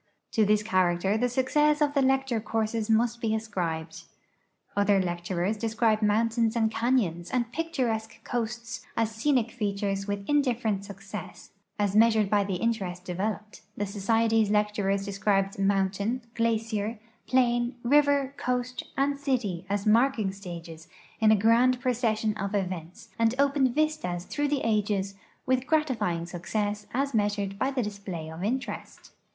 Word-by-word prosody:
To 220 - +3
this 210 0 +3
character 185 -1 +2
the 245 +3 +1
success 295 +4 +2
of 295 -1 +2
the 280 - +3
lecture 265 -3 +2
courses 220 0 -2
must 235 +1 +2
be 220 -1 +1
ascribed. 170 -6 -4 0.7
Other 205 -1 +3
lecturers 175 +3 -1
describe 220 0 +1
mountains 225 +2 +2
and 220 -1 +2
canyons 225 -8 0
and 240 -2 -1
picturesque 240 -8 -2
coasts 235 -1 -4
as 225 -1 +1
scenic 235 0 +1
features 200 -3 -2
with 200 -1 -3
in 290 0 +4
different 225 -6 -1
success 200 0 -9 0.3
as 205 -2 0
measured 220 -2 +4
bv 205 -1 +3
the 190 - -1
interest 185 -4 -2
developed; 210 +4 -4 0.2
the 205 - -1
Society's 220 +2 +2
lecturers 210 -2 +1
descril>ed 195 -1 0
mountain, 200 +4 0
glacier, 225 -1 -1 0.3
plain, 240 -1 +2
river, 285 +1 +3
coast, 250 0 -2 0.2
and 280 +1 +1
city 225 - -1
as 200 0 -1
marking 225 -2 +3
stages 170 -4 -9 0.3
in 220 -1 +4
a - - +7
grand 235 +4 +4
procession 225 -4 0
of 200 +1 -3
events, 180 -3 -4
and 230 +1 +3
opened 275 -3 +2
vistas 305 - 0
through 290 0 -1
the 285 -1 0
ages 205 -3 0 0.3
with 260 0 +1
gratifying 260 - +1
succe.ss 205 +4 -3
as 275 +2 -1
meas 205 -2 +2
ured 200 -1 -4
b\' 260 - +1
the 265 -3 -1
display 200 -6 -6
of 165 +3 -7
interest. 245 +4 -4
220 Hz, 145 wpm, -27 LUFS, 195-245 Hz, 0.7 s, a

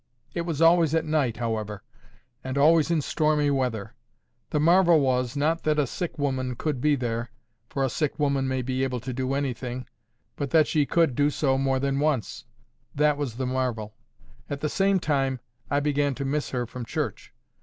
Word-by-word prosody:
It 170 0 -3
was 165 -1 0
always 165 -2 +5
at 160 0 +1
night, 150 -7 0
however, 110 -3 -3 0.6
and 130 +1 -4
always 155 +2 +5
in 165 -4 +1
stormy 150 -1 +1
weather. 125 -7 -1 0.6
The 150 - 0
marvel 170 +1 +5
was, 125 -1 0
not 160 +4 +1
that 155 -1 +1
a 150 - +3
sick 170 +7 -5
woman 130 -3 -1
could 145 -1 -2
be 150 +1 +3
there—for 120 0 -5
a - - +3
sick 145 +4 -2
woman 140 -2 +1
may 130 -1 -1
be 130 +1 -1
able 125 -2 -1
to 125 +2 -5
do 130 +2 -1
anything; 130 -2 -3 0.5
but 140 -2 -3
that 160 0 +5
she 150 -2 +1
could 165 -5 +2
do 145 +4 +2
so 140 -2 +1
more 135 0 +1
than 140 0 0
once—that 130 0 -2
was 140 -6 -4
the 130 +1 -2
marvel. 125 -5 -2 0.6
At 140 -1 -4
the 150 - 0
same 195 +2 +2
time, 135 -5 0 0.3
I 140 - +2
began 145 -1 0
to 140 - -4
miss 145 +2 -1
her 125 -2 -2
from 125 +1 -7
church. 125 -3 -4
135 Hz, 185 wpm, -26 LUFS, 125-150 Hz, 0.6 s, always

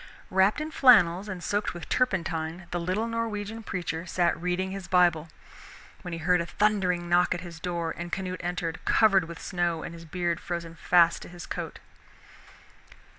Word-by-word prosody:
Wrapped 190 +6 +3
in 310 +1 -4
flannels 205 - +5
and 180 -3 -6
soaked 205 0 -1
with 175 - -8
turpentine, 170 -7 -1
the 175 - -1
little 185 +6 -1
Norwegian 225 -1 -3
preacher 180 -4 -4
sat 175 -1 +1
reading 180 +1 -1
his 195 -1 -6
Bible, 170 -3 +3 0.7
when 180 - -7
he 165 - -3
heard 175 +2 +2
a - - -3
thundering 185 -5 +1
knock 175 +1 +3
at 175 - -5
his 170 -2 -9
door, 170 -2 -2
and 175 0 -6
Canute 185 0 -3
entered, 175 -1 -3
covered 195 -5 +4
with 170 0 -9
snow 175 -2 -1
and 170 - -6
his 165 0 -11
beard 170 0 -2
frozen 170 -1 -5
fast 170 0 +3
to - - -10
his 175 0 -9
coat. - - -5
180 Hz, 175 wpm, -27 LUFS, 170-190 Hz, 0.7 s, flannels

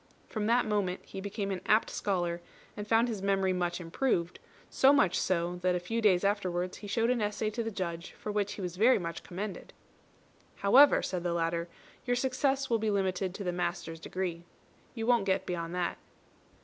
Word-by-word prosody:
From 215 -2 -2
that 240 +2 +3
moment 200 -4 -1
he 190 - -7
became 200 0 -3
an 185 - -3
apt 215 +2 +3
scholar, 175 -3 -1 0.3
and 210 -1 -6
found 230 +2 +4
his 220 -5 -4
memory 195 -1 +1
much 175 -1 -1
improved; 175 0 -1 0.3
so 270 - +5
much 280 -12 +3
so, 175 -1 0
that 180 0 +1
a - - 0
few 225 +6 -2
days 190 -4 +4
afterwards 185 -3 -1
he 205 - -9
showed 230 +4 +1
an 245 -3 0
essay 210 +1 -1
to 235 - -3
the 225 - -2
Judge 175 -4 -5
for 210 - -6
which 205 -1 -1
he - - -7
was 180 -1 -4
very 235 +6 +5
much 170 -2 -5
commended. 195 +2 -6 0.8
"However," 265 +9 +6
said 180 -2 -2
the 175 0 -1
latter, 170 0 -1 0.3
"your 245 -1 +1
success 270 +2 0
will 230 -1 +1
be 220 0 0
limited 190 -2 0
to 205 - -5
the 180 - -1
master's 175 -2 -3
degree. 175 0 -4 0.5
You 225 -2 -3
won't 235 -4 +3
get 190 0 +1
beyond 170 -1 -3
that." 180 -1 -2
195 Hz, 195 wpm, -30 LUFS, 175-220 Hz, 0.8 s, However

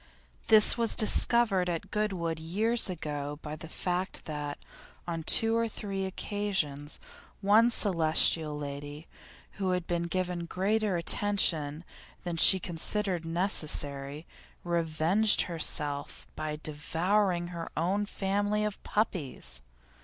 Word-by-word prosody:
This 220 +2 +9
was 230 -1 +6
discovered 215 -4 +4
at 175 +3 -5
Goodwood 185 -7 -3
years 210 +8 0
ago 150 -4 -5
by 150 0 -6
the 160 +1 -11
fact 180 +2 -4
that, 145 -2 -6 0.5
on 165 -1 -5
two 225 +7 +5
or 230 0 0
three 195 -3 -6
occasions, 190 -7 -4 0.4
one 215 +4 +4
Celestial 160 -6 +1
lady, 145 +2 -8 0.5
who 185 -1 0
had 180 -1 -3
been 170 0 -3
given 180 -1 -4
greater 200 +1 -1
attention 170 -5 +1 0.4
than 175 -2 -4
she 190 +3 +6
considered 180 +1 -3
necessary, 150 -4 +1 0.4
revenged 170 +5 +2
herself 150 -4 -4
by 155 -1 -5
devouring 175 +5 -2
her 170 -2 -7
own 195 +6 -1
family 205 +2 -2
of 210 -1 -6
puppies! 140 - -4
175 Hz, 115 wpm, -28 LUFS, 155-205 Hz, 0.5 s, This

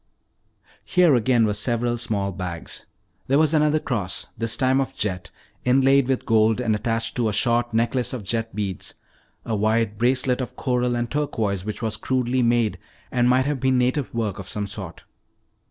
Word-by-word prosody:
Here 180 -5 +4
again 120 -1 +3
were 105 - 0
several 120 +3 0
small 100 -4 -1
bags. 90 -3 -6 0.4
There 135 - +3
was 155 0 +3
another 150 0 +3
cross, 105 -11 -3
this 115 -1 -1
time 130 0 +2
of 135 0 -4
jet 90 -3 -3 0.3
inlaid 135 +1 +4
with 130 -1 -1
gold 110 0 +3
and 115 -3 +1
attached 115 +1 -1
to 115 -3 +1
a - - -3
short 120 +1 +1
necklace 120 +2 +1
of 125 -5 -5
jet 115 +3 -3
beads; 100 -4 -4 0.5
a 110 - -1
wide 110 0 0
bracelet 125 +1 +2
of 125 - -6
coral 125 -1 0
and 120 0 -1
turquoise 115 -10 -1
which 110 +2 -5
was 110 -2 0
crudely 130 0 0
made 115 -6 +1 0.3
and 125 0 +2
might 130 +1 +3
have 145 -1 -1
been 130 0 +2
native 125 +2 0
work 110 -5 -2
of 100 - -8
some 105 -1 -3
sort. 100 -4 -7
120 Hz, 175 wpm, -23 LUFS, 105-130 Hz, 0.5 s, Here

